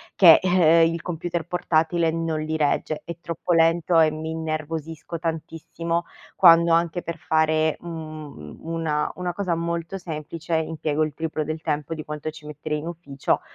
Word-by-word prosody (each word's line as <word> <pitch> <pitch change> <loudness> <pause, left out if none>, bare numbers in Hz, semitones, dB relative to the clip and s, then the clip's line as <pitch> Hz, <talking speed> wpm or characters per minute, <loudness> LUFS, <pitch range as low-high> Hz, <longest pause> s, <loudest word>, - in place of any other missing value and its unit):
che, 170 -4 +9
eh, 170 -3 +5
il 165 0 -4
computer 170 -1 -3
portatile 165 -1 +1
non 165 -1 -1
li 160 +1 -2
regge. 150 +1 0
È 170 - -5
troppo 170 +2 -2
lento 165 +1 +4
e 160 -1 +6
mi 155 +1 -5
innervosisco 160 0 -4
tantissimo 165 +1 -3 0.3
quando 170 -2 +7
anche 170 +1 +1
per 170 0 -5
fare, 155 0 +1
mhmm, 155 - -8
u 165 - -6
una 150 -2 0
una 180 -1 -3
cosa 185 -3 -1
molto 170 +2 -3
semplice 160 -1 -7
impiego 155 -1 -1
il 155 -2 -2
triplo 155 -1 -3
del 155 +1 -4
tempo 150 0 -2
di 155 -1 -6
quanto 150 +1 -5
ci 155 -1 -14
metterei 150 +1 -4
in 160 - -7
ufficio, 150 -5 -2
160 Hz, 165 wpm, -24 LUFS, 155-170 Hz, 0.3 s, che